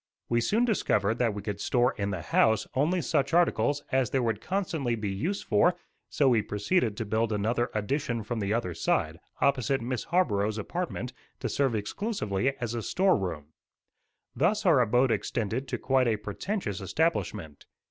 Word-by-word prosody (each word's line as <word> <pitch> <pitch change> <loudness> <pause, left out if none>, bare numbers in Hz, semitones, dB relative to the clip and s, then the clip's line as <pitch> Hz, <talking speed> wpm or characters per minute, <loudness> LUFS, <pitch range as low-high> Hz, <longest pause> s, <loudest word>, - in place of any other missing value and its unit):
We 120 0 +2
soon 220 - +2
discovered 110 - +1
that 115 -4 +1
we 100 - -6
could 105 -1 -4
store 125 +1 +2
in 100 -1 -2
the 95 -5 -4
house 110 +5 +3
only 160 +6 +1
such 140 +5 +1
articles 145 -4 +2
as 130 -3 +2
there 130 -2 0
would 110 -2 -1
constantly 165 -10 -1
be 105 -3 -3
use 170 - -2
for, 105 -2 +3 0.3
so 140 - +2
we 120 -4 +4
proceeded 105 - 0
to 115 - -3
build 110 +2 0
another 115 +4 0
addition 115 +2 -1
from 115 +2 -3
the 100 -1 -1
other 110 -6 -1
side, 85 - 0 0.2
opposite 135 0 +2
Miss 120 +1 -3
Harborough's 110 - +1
apartment, 130 - -4 0.3
to 125 - -2
serve 130 +2 +1
exclusively 120 - -2
as 120 -2 -3
a 120 - -2
store 185 - +2
room. 80 -6 -4 0.8
Thus 195 +8 +1
our 160 -8 +5
abode 125 +2 +3
extended 115 +3 -2
to 130 -2 -2
quite 130 -1 +2
a 110 -2 +2
pretentious 105 - -4
establishment. 100 - -2
120 Hz, 170 wpm, -28 LUFS, 105-140 Hz, 0.8 s, our